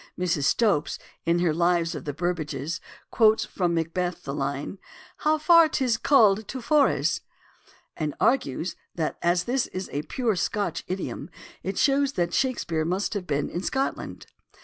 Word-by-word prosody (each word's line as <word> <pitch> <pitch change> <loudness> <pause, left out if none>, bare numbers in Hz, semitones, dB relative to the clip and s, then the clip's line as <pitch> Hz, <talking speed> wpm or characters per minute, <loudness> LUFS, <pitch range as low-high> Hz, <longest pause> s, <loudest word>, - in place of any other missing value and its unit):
Mrs. 170 -6 0
Stopes 185 -1 +2 0.3
in 170 +1 +3
her 175 -2 +2
Lives 170 0 +2
of - - -7
the 145 - -2
Burbages 155 -2 -3 0.3
quotes 220 -1 +4
from 175 -3 -1
Macbeth 175 +2 -2
the 140 - -4
line, 140 +5 -3 0.2
" - - -21
How 310 +1 +2
far 335 +1 +6
is't 245 -4 +1
called 220 -7 +4
to 265 - -5
Forres?" 280 +4 +2 0.7
and 155 -2 -3
argues 175 - +1 0.2
that 160 -3 -2
as 175 0 +2
this 250 +5 0
is 185 +1 -6
a 145 - -1
pure 230 - -1
Scotch 205 +2 -1
idiom 165 -5 -4 0.3
it 195 0 -4
shows 280 0 +3
that 175 -5 -1
Shakespeare 205 -12 0
must 185 +7 -1
have 195 -4 -4
been 145 -1 0
in 175 - -4
Scotland. 265 +7 -3
180 Hz, 160 wpm, -26 LUFS, 165-230 Hz, 0.7 s, far